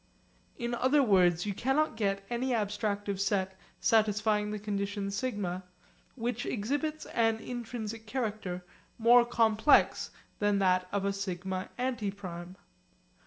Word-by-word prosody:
In 240 -1 -3
other 260 +4 +3
words 180 -5 +4
you 205 - -1
cannot 270 +9 +1
get 195 -2 -1
any 245 +3 -1
abstractive 205 -2 -1
set 190 -1 0 0.2
satisfying 215 -1 +2
the 210 - -3
condition 200 -1 -3
σ 255 +5 -1 0.8
which 240 -1 -2
exhibits 290 +8 -2
an 225 -1 +1
intrinsic 225 -2 -6
character 215 -7 -3 0.3
more 235 +1 +7
complex 230 +2 +3 0.3
than 205 -1 +3
that 185 -2 +2
of 200 -1 -1
a 200 - +1
σ 200 0 -4
antiprime. 190 -1 -4
210 Hz, 120 wpm, -30 LUFS, 195-240 Hz, 0.8 s, more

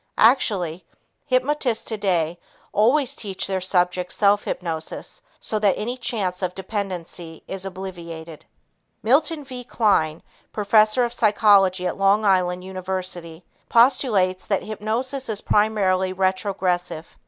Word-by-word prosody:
Actually, 190 - +3 0.4
hypnotists 255 -2 0
today 180 -6 -1 0.3
always 260 +6 +2
teach 195 -3 -4
their 190 -1 -2
subjects 180 -1 0
self 205 0 +3
hypnosis 165 - -5 0.2
so 215 - -1
that 205 -3 +2
any 240 +4 -3
chance 200 -7 -3
of 180 -1 -2
dependency 185 -4 -5
is 190 0 -5
obviated. 170 -4 -8 0.6
Milton 295 +6 +2
V. 255 -2 -8
Kline, 195 -10 +1 0.3
professor 215 +3 +3
of 240 - -4
psychology 200 -5 +4
at 180 - -2
Long 200 +2 +3
Island 180 -2 +2
University, 185 -3 -5 0.2
postulates 215 -7 +3
that 200 -3 0
hypnosis 230 +5 -3
is 210 -2 0
primarily 190 -3 +2
retrogressive. 185 -3 -1
195 Hz, 115 wpm, -23 LUFS, 180-220 Hz, 0.6 s, psychology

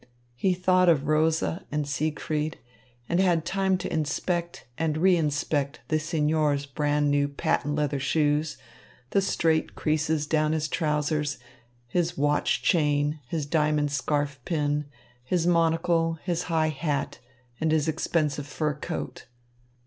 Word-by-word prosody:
He 180 +10 +1
thought 185 0 +3
of 150 -4 +3
Rosa 160 +3 +1
and 150 -1 -1
Siegfried 150 +2 -2 0.5
and 170 - +1
had 175 -4 +2
time 190 0 +1
to - - -5
inspect 170 +3 -2
and 160 0 -1
reinspect 150 -4 +1
the 155 - +2
signor's 150 -2 +1
brand 145 0 0
new 145 0 +2
patent 145 +1 -1
leather 145 -2 0
shoes, 150 +2 +1 0.5
the 200 - +3
straight 165 -4 +1
creases 155 0 0
down 155 0 +1
his 155 -1 0
trousers, 150 -1 0 0.5
his 175 +6 -1
watch 145 +1 +1
chain, 150 -2 +2
his 155 +1 -2
diamond 150 -1 +1
scarf 145 0 -1
pin, 150 -3 0 0.4
his 170 +6 0
monocle, 165 -1 +2
his 175 -1 -1
high 160 -1 +2
hat, 150 -1 -2 0.4
and 160 0 +1
his 155 0 +2
expensive 150 -3 -1
fur 150 0 -1
coat. 150 - -6
155 Hz, 130 wpm, -26 LUFS, 145-165 Hz, 0.5 s, thought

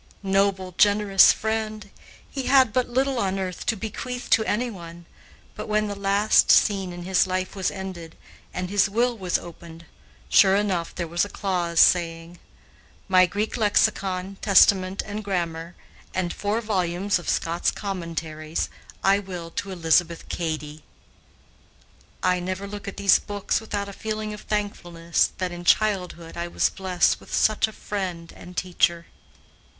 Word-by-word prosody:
Noble, 195 -1 +1
generous 205 -1 +6
friend! 215 -2 -3 0.4
He 270 -2 -5
had 260 -5 +5
but 255 -1 +1
little 265 +1 0
on 195 -2 -1
earth 185 -2 -5
to 225 - +2
bequeath 245 +4 -6
to 220 - +5
anyone, 180 -8 -4 0.5
but - - -7
when 215 0 +1
the 205 - -3
last 200 +2 +3
scene 195 -3 +4
in 175 0 -8
his 190 +1 +2
life 185 +1 -3
was 190 -2 0
ended, 185 -4 -8 0.3
and 180 0 -4
his 200 -1 +3
will 240 +4 +1
was 185 -5 -1
opened, 170 -1 -12 0.4
sure 190 - +5
enough 190 -5 -1
there 170 -2 -3
was 170 +2 0
a 205 - -4
clause 175 -5 -1
saying: 165 -1 +2 0.7
"My 185 -1 +5
Greek 205 +6 -3
lexicon, 195 -3 +1
Testament, 195 -1 +4
and 215 +1 -5
grammar, 170 -3 -3 0.4
and 180 -2 -1
four 210 +3 -1
volumes 190 -2 0
of 175 - -6
Scott's 170 +1 0
commentaries, 165 -5 -4 0.3
I 195 +1 +4
will 180 -4 -7
to 200 - -4
Elizabeth 170 -1 +1
Cady." 155 -2 -4 1.4
I 180 0 +2
never 185 +2 -4
look 205 0 -8
at 200 - -6
these 200 -1 +5
books 205 +1 -2
without 205 -2 -4
a 200 - -8
feeling 215 0 -4
of 210 - -9
thankfulness 175 -5 -1
that 185 -1 -2
in 175 0 -7
childhood 180 -4 0
I 170 0 -3
was - - +1
blessed 185 -2 +1
with - - -15
such 215 0 +2
a - - -9
friend 185 -6 -5
and 180 0 -13
teacher. 175 -2 +1
190 Hz, 150 wpm, -24 LUFS, 175-205 Hz, 1.4 s, generous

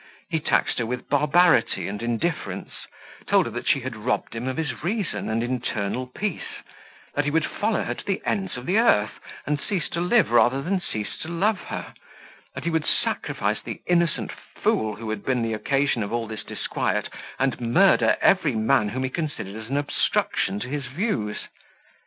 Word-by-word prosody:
He 160 - +2
taxed 155 - +1
her 120 - 0
with 125 +1 -4
barbarity 145 - +4
and 105 +2 -4
indifference; 120 +8 -2 0.6
told - - +4
her, - - -4
that - - -5
she - - +3
had - - -5
robbed - - -1
him 115 +2 -4
of 130 - -2
his 150 -5 -3
reason 195 - -1
and 115 +1 0
internal 120 -1 -2
peace; 190 +9 -4 0.5
that 145 - 0
he - - +2
would 160 +1 +2
follow 215 0 0
her - - -2
to - - -9
the 195 - 0
ends 190 -8 -1
of 125 - -7
the 195 +8 +3
earth, 110 - +3 0.3
and 145 0 0
cease 185 -6 -1
to 170 - -2
live 220 +6 +4
sooner 120 +3 +4
than 185 +3 0
cease 110 -10 -4
to - - -5
love 190 +5 +1
her; - - -6 0.6
that - - -5
he 170 - 0
would 160 -1 0
sacrifice - - 0
the - - -7
innocent 170 -2 +1
fool 110 -1 -1
who 110 +1 -5
had 110 -2 -4
been 125 -3 +1
the 115 -1 -1
occasion 135 +3 +1
of 100 - -3
all 120 0 -1
this 110 0 -6
disquiet, - - -1 0.3
and 135 -2 0
murder 175 +12 +4
every 165 -10 +4
man 110 0 +3
whom 130 +4 -2
he 130 - 0
considered 125 - -4
as 110 +1 -8
an 140 - 0
obstruction 145 -7 0
to 105 - -4
his 140 0 -3
views. 125 - -2
135 Hz, 190 wpm, -25 LUFS, 115-170 Hz, 0.6 s, barbarity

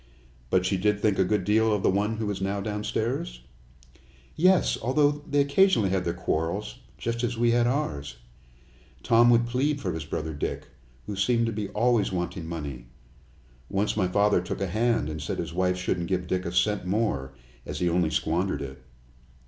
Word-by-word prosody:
"But 90 -1 +2
she 95 +1 +1
did 105 +2 +1
think 105 -2 +1
a - - +6
good 95 +1 0
deal 110 +3 +3
of 105 -2 0
the - - +4
one 105 +3 0
who 110 -2 -2
is 95 - -5
now 100 +1 -1
downstairs?" 105 - -3 0.9
"Yes, 185 +2 +4
although 145 +5 +3 0.2
they 145 0 +3
occasionally 140 - +3
had 95 -1 0
their 85 0 -1
quarrels, 80 -3 -2 0.2
just 115 +1 -3
as 120 -1 -1
we 120 0 +3
had 120 0 +3
ours. 75 - -2 0.9
Tom 120 0 +5
would 120 0 +4
plead 135 +5 0
for - - -3
his 80 -1 -4
brother 80 0 -4
Dick, 75 - -4 0.4
who 105 - -5
seemed 115 +4 +2
to 115 - -1
be 105 -2 -4
always 115 -1 +2
wanting 90 -2 -3
money. 70 -7 -6 0.8
Once 100 +1 0
my 100 -4 +1
father 100 0 +3
took 90 - -5
a 100 - 0
hand 110 -2 +1
and 75 0 -5
said 75 - -3
his - - -4
wife 90 0 +1
shouldn't 90 -1 -2
give 90 -1 0
Dick 90 0 -2
a - - -3
cent 100 +3 +1
more, 90 - -1 0.3
as - - -6
he 90 - 0
only 85 -1 +2
squandered 80 0 -1
it. 65 -1 -9
100 Hz, 190 wpm, -26 LUFS, 85-115 Hz, 0.9 s, a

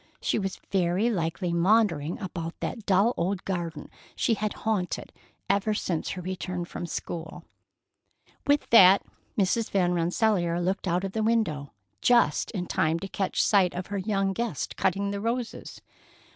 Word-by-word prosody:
She - - 0
was 195 -2 -3
very 190 +4 +2
likely 170 -1 -1
maundering 170 -4 +2
about 170 -4 -5
that 225 -3 -5
dull 200 +5 +4
old 190 +2 -1
garden 170 -5 -4 0.2
she 230 - +2
had 215 -1 -2
haunted 200 -5 -1 0.3
ever 200 +2 +1
since 170 -5 -2
her 180 - -5
return 180 -1 -4
from 175 0 -6
school. 165 0 -6 1.0
With 285 0 +3
that, 195 -4 +8 0.3
Mrs. 210 +3 +1
Van 180 -3 +2
Rensselaer 175 0 +1
looked 190 +3 -1
out 180 +2 +1
of 195 - -3
the 220 - -2
window, 215 - 0 0.3
just 235 -12 +3
in 185 -5 -3
time 160 -1 +1
to 195 - -5
catch 195 0 0
sight 190 -4 +3
of 180 +1 -3
her 200 - -1
young 195 -1 0
guest 230 - -3
cutting 200 +2 0
the 200 0 -3
roses. 235 +1 -4
190 Hz, 155 wpm, -27 LUFS, 175-210 Hz, 1.0 s, that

